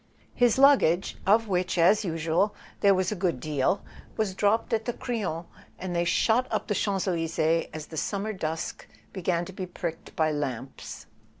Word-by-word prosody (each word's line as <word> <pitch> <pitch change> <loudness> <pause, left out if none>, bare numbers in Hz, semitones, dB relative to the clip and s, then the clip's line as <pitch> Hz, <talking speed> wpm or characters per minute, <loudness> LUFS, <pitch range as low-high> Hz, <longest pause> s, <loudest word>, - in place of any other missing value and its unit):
His 245 -1 +3
luggage, 265 - +4
of 220 +3 +4
which, 180 -2 0
as 180 +6 +5
usual, 165 +3 0 0.2
there 200 -1 +5
was 185 +1 0
a - - -1
good 175 -7 -1
deal, 150 +6 0 0.3
was 215 -3 0
dropped 205 +4 +1
at 220 0 0
the 240 - -1
Crillon, 195 -11 -3 0.3
and 180 -1 -4
they 170 0 +1
shot 230 +8 +2
up - - -1
the 210 - -1
Champs 195 -1 0
Elysees 165 -2 +1
as 155 -1 -6
the 160 - -9
summer 205 +6 -2
dusk 160 -3 -4 0.3
began 175 -2 -1
to 190 - -10
be 185 0 -5
pricked 170 -2 -6
by 155 -1 +2
lamps. 135 -3 -5
180 Hz, 175 wpm, -27 LUFS, 165-205 Hz, 0.3 s, as